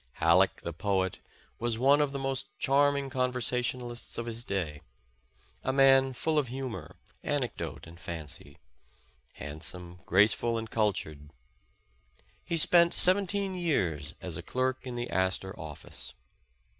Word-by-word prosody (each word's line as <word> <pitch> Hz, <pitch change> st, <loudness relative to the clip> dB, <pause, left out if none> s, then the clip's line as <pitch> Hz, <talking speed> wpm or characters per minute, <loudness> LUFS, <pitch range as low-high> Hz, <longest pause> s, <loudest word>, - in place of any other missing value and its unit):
Halleck, 90 Hz, +3 st, +3 dB
the 85 Hz, -, -4 dB
poet, 95 Hz, +1 st, -1 dB, 0.4 s
was 120 Hz, -1 st, -1 dB
one 140 Hz, +4 st, +5 dB
of 145 Hz, -2 st, +1 dB
the 140 Hz, -, -4 dB
most 135 Hz, -1 st, -2 dB
charming 140 Hz, 0 st, +2 dB
con 130 Hz, -2 st, +1 dB
versationalists 125 Hz, -1 st, -3 dB
of 115 Hz, -, -3 dB
his 115 Hz, 0 st, -4 dB
day, 85 Hz, -9 st, -3 dB, 0.8 s
a 130 Hz, -, +1 dB
man 135 Hz, -1 st, +5 dB
full 155 Hz, +4 st, +1 dB
of 140 Hz, -, -1 dB
humor, 120 Hz, -, -6 dB, 0.3 s
anec 140 Hz, -4 st, -1 dB
dote -, -, -6 dB
and 85 Hz, +1 st, -13 dB
fancy; 75 Hz, -4 st, -7 dB, 0.8 s
handsome, 85 Hz, +4 st, -5 dB
graceful 110 Hz, +4 st, +3 dB
and 110 Hz, -1 st, -5 dB
cultured. 80 Hz, -9 st, -1 dB, 1.1 s
He 170 Hz, -, -2 dB
spent 170 Hz, +1 st, +6 dB
seventeen 195 Hz, +1 st, +4 dB
years 85 Hz, -, -1 dB
as 90 Hz, -4 st, -4 dB
a -, -, -5 dB
clerk 130 Hz, +1 st, -2 dB
in 125 Hz, -, -5 dB
the 120 Hz, 0 st, -3 dB
Astor 95 Hz, +1 st, 0 dB
office. 75 Hz, -2 st, -4 dB
120 Hz, 135 wpm, -29 LUFS, 90-135 Hz, 1.1 s, spent